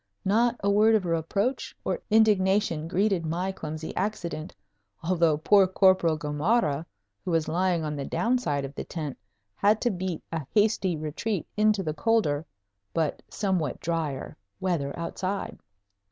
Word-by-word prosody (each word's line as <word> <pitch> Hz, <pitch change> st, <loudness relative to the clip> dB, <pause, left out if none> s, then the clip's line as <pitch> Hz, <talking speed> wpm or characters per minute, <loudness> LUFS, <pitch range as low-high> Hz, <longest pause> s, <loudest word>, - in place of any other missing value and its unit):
Not 230 Hz, +5 st, +3 dB
a 200 Hz, -, +3 dB
word 215 Hz, +2 st, +5 dB
of 205 Hz, -4 st, +1 dB
reproach 175 Hz, -, -1 dB
or 485 Hz, -, -1 dB
indignation 200 Hz, -6 st, +3 dB
greeted 190 Hz, 0 st, +1 dB
my 175 Hz, +4 st, -1 dB
clumsy 155 Hz, -3 st, -6 dB
accident, 175 Hz, -5 st, -3 dB, 0.5 s
although 165 Hz, -3 st, +2 dB
poor 195 Hz, +5 st, +5 dB
Corporal 185 Hz, -4 st, +4 dB
Gamarra, 155 Hz, +1 st, 0 dB, 0.4 s
who -, -, -4 dB
was 165 Hz, -2 st, +1 dB
lying 175 Hz, 0 st, +1 dB
on 150 Hz, -1 st, -3 dB
the 140 Hz, -, -3 dB
down 245 Hz, +2 st, +1 dB
side 145 Hz, -, -1 dB
of 135 Hz, -, -8 dB
the -, -, -5 dB
tent, 150 Hz, -5 st, -5 dB, 0.4 s
had 210 Hz, -, +3 dB
to 240 Hz, -, +2 dB
beat 185 Hz, -3 st, -4 dB
a 160 Hz, -5 st, -4 dB
hasty 205 Hz, -5 st, +2 dB
retreat 160 Hz, +6 st, -3 dB
into 210 Hz, -2 st, +3 dB
the 155 Hz, -3 st, -2 dB
colder 160 Hz, -6 st, +1 dB, 0.5 s
(but 160 Hz, -3 st, 0 dB
somewhat 185 Hz, -, -1 dB
drier) 160 Hz, -5 st, -3 dB, 0.2 s
weather 170 Hz, -7 st, -1 dB
outside. 185 Hz, +4 st, -3 dB
180 Hz, 145 wpm, -27 LUFS, 155-205 Hz, 0.5 s, word